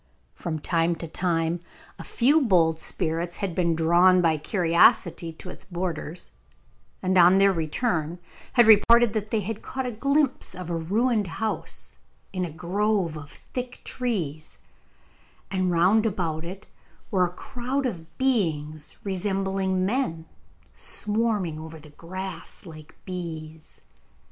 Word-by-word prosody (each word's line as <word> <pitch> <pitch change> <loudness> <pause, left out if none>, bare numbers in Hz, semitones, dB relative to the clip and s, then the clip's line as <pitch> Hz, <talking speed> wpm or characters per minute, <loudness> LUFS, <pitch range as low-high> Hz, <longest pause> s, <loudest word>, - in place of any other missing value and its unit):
From 165 -3 -4
time 165 +2 +1
to 165 0 -6
time 165 0 0 0.4
a - - -6
few 285 +6 +3
bold 170 - +3
spirits 170 +1 -1
had 195 -4 -3
been 170 -2 +1
drawn 175 +3 +5
by 160 -3 +2
curiosity 170 -1 +3
to 180 - -10
its - - -8
borders, 175 -2 -4 0.7
and 185 0 +1
on 180 +2 +7
their 195 0 +5
return 165 0 -1 0.4
had 240 -2 +6
reported 225 +1 +6
that 215 -1 -2
they 220 -1 0
had 215 +2 -5
caught 265 0 -4
a 250 - -2
glimpse 275 +4 0
of 180 -2 -6
a - - 0
ruined 210 +6 +1
house 215 +6 -4 0.4
in 185 -1 -1
a 175 - -2
grove 180 +2 0
of 145 -2 -8
thick 250 - -7
trees, 170 - -3 0.9
and 185 -1 +1
round 185 +6 +4
about 165 -6 -2
it 185 +4 -8 0.5
were 185 -2 +3
a 175 - -11
crowd 260 +6 -3
of 165 -9 -5
beings 155 - -1
resembling 190 -1 -1
men, 190 -8 -1 0.5
swarming 210 -7 -1
over 160 0 -9
the 150 0 -15
grass 185 +3 -7
like 155 -3 -12
bees. 160 -4 -7
180 Hz, 135 wpm, -26 LUFS, 165-210 Hz, 0.9 s, on